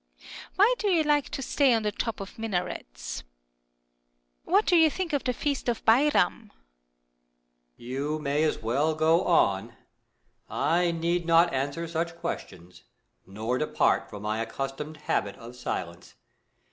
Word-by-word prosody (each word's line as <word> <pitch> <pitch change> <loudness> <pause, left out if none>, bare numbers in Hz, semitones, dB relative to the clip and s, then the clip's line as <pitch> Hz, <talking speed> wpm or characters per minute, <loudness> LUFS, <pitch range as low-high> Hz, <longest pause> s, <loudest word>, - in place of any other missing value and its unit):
Why 415 +6 +5
do 425 - -1
you 345 -5 +3
like 295 -2 +2
to 270 - -4
stay 270 -1 +3
on 225 - 0
the 210 - 0
tops 230 -1 -3
of 195 +3 -9
minarets? - - -4 1.2
What 400 +5 +3
do 360 - +3
you 320 -2 +6
think 340 0 -4
of 285 - 0
the 250 - +2
feast 275 0 -2
of 235 - -3
Bairam? 255 -3 +3
3foon. - - -27 1.3
You 135 +5 -3
may 145 0 -1
as 155 - +1
well 140 +8 0
go 160 +2 +3
on. 115 - +2 0.7
I 175 +2 +1
need 170 +1 -1
not 170 +1 +5
answer 140 +5 -2
such 170 +1 -2
questions, 90 - -7 0.5
nor 110 +6 -2
depart 155 - +1
from 105 0 -9
my 110 +1 -1
accustomed 135 +6 -5
habit 100 -1 0
of 120 +2 -11
silence. 90 -7 -5
165 Hz, 145 wpm, -27 LUFS, -, 1.3 s, you